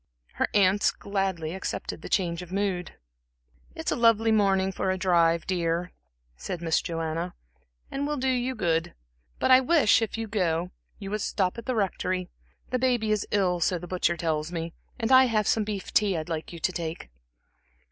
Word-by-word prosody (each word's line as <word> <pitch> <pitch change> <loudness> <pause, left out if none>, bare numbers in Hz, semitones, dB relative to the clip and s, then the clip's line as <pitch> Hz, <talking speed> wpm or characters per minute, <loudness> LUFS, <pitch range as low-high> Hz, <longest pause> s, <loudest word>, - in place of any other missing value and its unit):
Her - - 0
aunts 200 0 +4
gladly 190 -5 -2
accepted 190 - -4
the - - -8
change 170 -3 0
of 180 0 -10
mood. 190 -3 -2 0.8
"It's - - -3
a - - +1
lovely 230 -1 +4
morning 195 -3 +3
for 190 - -2
a 185 - 0
drive, 170 -3 +3
dear," 175 -1 -1 0.4
said 170 - -5
Miss 165 -1 +1
Joanna, 165 +1 -3 0.6
"and 280 +1 -2
will 295 0 -2
do 265 0 -1
you 255 0 0
good. 165 - 0 0.4
But - - +1
I 255 - +9
wish, 265 -5 +4
if 225 0 -2
you 225 - -2
go, 180 -4 0 0.3
you 195 -2 -7
would 215 0 -2
stop 190 +2 -1
at 230 - -11
the 255 - 0
Rectory 185 -3 -1 0.4
the 255 - +1
baby 240 -4 +1
is 210 -1 0
ill, 185 -3 +1
so 180 +2 +1
the 175 - -8
butcher 175 -1 0
tells 160 -1 -1
me, 165 -1 -4 0.3
and 225 +1 -1
I 260 0 +8
have 215 -4 +1
some 220 - +2
beef 205 -2 -5
tea 200 -4 +3
I'd 155 +1 -5
like 160 -1 -4
you 170 - -8
to 165 +3 0
take." 165 - -5
190 Hz, 190 wpm, -27 LUFS, 170-220 Hz, 0.8 s, I